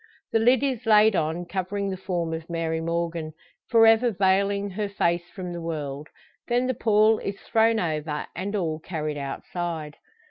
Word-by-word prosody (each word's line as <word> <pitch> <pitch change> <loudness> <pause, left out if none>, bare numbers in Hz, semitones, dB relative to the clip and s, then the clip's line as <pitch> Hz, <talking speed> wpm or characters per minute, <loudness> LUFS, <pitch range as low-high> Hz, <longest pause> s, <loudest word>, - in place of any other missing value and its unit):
The 225 - +3
lid 245 +4 +4
is 260 -5 -2
laid 215 -1 +6
on, 165 +2 -1
covering 195 +2 -3
the - - -2
form 175 -3 -3
of 160 +1 -6
Mary 165 -1 -1
Morgan 165 -1 -2 0.4
for 230 -2 +6
ever 225 +2 +5
veiling 200 0 +1
her 205 +2 -3
face 175 -3 0
from 180 -3 -6
the 170 - -5
world. 150 -3 -4 0.4
Then 245 +1 +1
the 255 - 0
pall 215 -1 +3
is 200 0 -5
thrown 225 0 +2
over, 155 -3 -2
and 195 +4 -3
all 160 -5 -1
carried 155 -3 -4
outside. 155 +2 -5
180 Hz, 170 wpm, -25 LUFS, 165-215 Hz, 0.4 s, laid